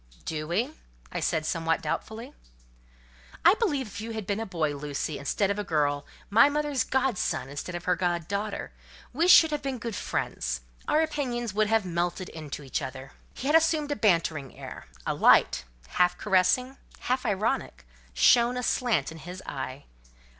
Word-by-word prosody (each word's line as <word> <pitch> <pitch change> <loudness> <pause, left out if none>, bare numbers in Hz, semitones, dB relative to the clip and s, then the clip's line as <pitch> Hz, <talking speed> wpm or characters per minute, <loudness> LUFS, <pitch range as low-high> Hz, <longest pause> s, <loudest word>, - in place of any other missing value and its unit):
"Do 155 -1 -3
we?" 225 - 0 0.4
I - - -3
said, 155 -1 0
somewhat 165 0 0
doubtfully. 230 +6 -4 1.1
"I - - +9
believe 295 - +1
if 205 -1 -8
you 225 +1 -5
had 220 -2 -4
been 200 +2 -1
a 225 - -4
boy, 160 -6 -1
Lucy, 145 +1 -4
instead 195 +8 0
of 200 - -2
a - - -1
girl—my 155 - +2
mother's 295 -4 0
god 265 -5 0
son 130 0 -1
instead 145 +5 -5
of 175 - -5
her 180 - +3
god 175 -2 -1
daughter, 205 +1 -3 0.4
we 325 +7 +2
should 325 -3 +8
have 300 - -1
been 270 -2 -3
good 230 -2 -5
friends: - - -2 0.3
our 310 - +3
opinions 245 -8 -2
would 215 +1 +2
have 220 -2 +2
melted 175 +1 -2
into 150 -2 -7
each 135 +2 -2
other." 130 0 -7 0.2
He - - -7
had 295 +3 +3
assumed 315 -2 +3
a - - +1
bantering 165 - +1
air: - - -9 0.2
a - - 0
light, - - +4 0.2
half 180 0 +2
caressing, 220 +7 +2 0.2
half 255 +1 0
ironic, 195 - -1 0.3
shone 240 - +4
aslant 245 -5 0
in 160 - -10
his 175 +4 -8
eye. 130 0 -5
200 Hz, 170 wpm, -27 LUFS, 160-250 Hz, 1.1 s, I